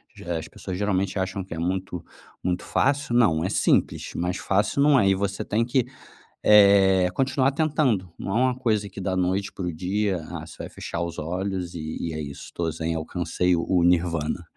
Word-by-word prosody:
D - - -13
eh, 85 -1 -2
as 80 - -6
pessoas 90 - -7
geralmente 100 -1 0
acham 95 0 -2
que 90 -3 -8
é - - -8
muito 90 0 -3 0.4
muito 90 -1 -1
fácil, 140 -3 +1
não, 85 -10 +4
é 95 - -1
simples, - - +1
mas 90 +1 -1
fácil 100 +8 +1
não 145 -2 +5
é. 100 - +4
E 95 - +3
você 100 0 -2
tem 110 +3 0
que, 125 0 +1 0.6
eh, 100 -3 +6
continuar 135 +2 +1
tentando. 140 - 0
Não - - -5
é 120 - +3
uma 130 -1 +2
coisa 110 -5 0
que 100 - -10
da 95 -1 -1
noite 95 +2 0
para 95 - -5
o - - -1
dia, 95 +1 -1
"Ah, 85 -3 -6
você - - -13
vai - - -7
fechar 85 - -5
os 85 -1 -5
olhos 90 +2 -3
e 80 -1 -5
e 80 - -4
é - - -4
isso, 70 -2 -7
tô 85 -1 -2
zen, 80 +1 -3
alcancei 90 +2 0
o 85 - -1
o 90 -2 +3
Nirvana". 85 -3 +1
95 Hz, 210 wpm, -25 LUFS, 85-105 Hz, 0.6 s, eh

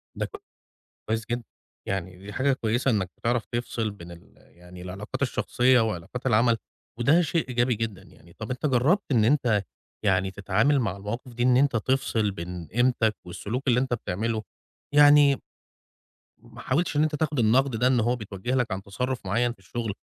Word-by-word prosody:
ده - - -3 0.8
كويس 110 0 -1
جدًا، 120 0 -1 0.4
يعني 95 -2 -3
دي 100 +3 -10
حاجة 135 +1 +2
كويسة 120 +1 0
إنك 95 -5 0
بتعرف 120 0 0
تفصل 120 -2 -3
بين 85 -4 -11
ال 85 0 -15
يعني 90 +1 -15
العلاقات 95 +7 -6
الشخصية 130 -1 +2
وعلاقات 110 +3 -3
العمل، 115 -1 +3 0.4
وده 150 +9 +4
شيء 165 -1 0
إيجابي 120 0 +1
جدًا 110 -3 -4
يعني. 85 +1 -19
طَب 110 +5 -7
أنت 125 +4 -3
جربت 145 - +3
إن 115 -5 +4
أنت 115 -6 +2 0.4
يعني 95 -1 +2
تتعامل 105 +9 +2
مع 100 -6 -1
المواقف 115 +5 -6
دي 120 +1 -1
إن 125 0 +5
أنت 135 -1 +3
تفصل 115 -2 0
بين 90 -2 -7
قيمتك 115 +2 +2
والسلوك 110 +9 -5
اللي 125 -1 +4
أنت 130 -1 -1
بتعمله؟ 110 +1 -2 0.5
يعني، 145 -1 +6 1.0
ما - - -15
حاولتش 155 +5 0
إن 150 - +4
أنت 155 -1 0
تاخد 150 -2 -1
النقد 125 +3 +3
ده 125 +3 +2
إن 130 -1 +3
هو 120 +2 +2
بيتوجه 105 +2 -4
لك 125 -5 0
عن 95 +1 -2
تصرف 125 +4 -3
معيّن 120 +5 +1
في 120 - -29
الشغل، 110 +3 -4
120 Hz, 175 wpm, -26 LUFS, 100-130 Hz, 1.0 s, يعني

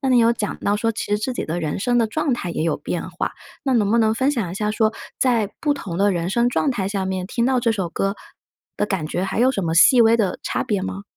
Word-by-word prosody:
那 270 - -1
你 250 -1 +5
有 230 0 +5
讲 210 -3 -4
到 205 +1 +1
说 225 +2 0
其 - - -4
实 205 0 0
自 255 +4 -2
己 - - -3
的 170 +2 -3
人 155 +2 -2
生 245 +4 +1
的 230 - +3
状 290 +3 -1
态 180 -7 -4
也 165 - -2
有 165 -2 0
变 170 +4 -4
化， 175 - -3 0.3
那 265 - +1
能 210 -3 +2
不 235 - +3
能 220 -1 +3
分 265 +4 +1
享 230 -11 -2
一 180 - -6
下 210 +1 -1
说， 220 0 +1 0.3
在 230 -6 +2
不 295 -2 +1
同 180 -9 -6
的 200 0 +3
人 175 +1 -2
生 240 +3 +2
状 275 +3 +1
态 195 -6 -2
下 195 -2 -2
面 185 -1 -3
听 235 +4 -1
到 255 0 +2
这 230 -1 +2
首 190 -5 -2
歌 195 +4 -1 0.6
的 210 - 0
感 185 -7 -2
觉 180 +4 -2
还 195 +4 -2
有 255 - +5
什 200 -7 -2
么 160 0 -1
细 245 +8 +7
微 230 0 +6
的 205 -5 0
差 - - -1
别 205 -3 -1
吗？ 195 +1 -5
210 Hz, 305 characters per minute, -21 LUFS, 190-240 Hz, 0.6 s, 细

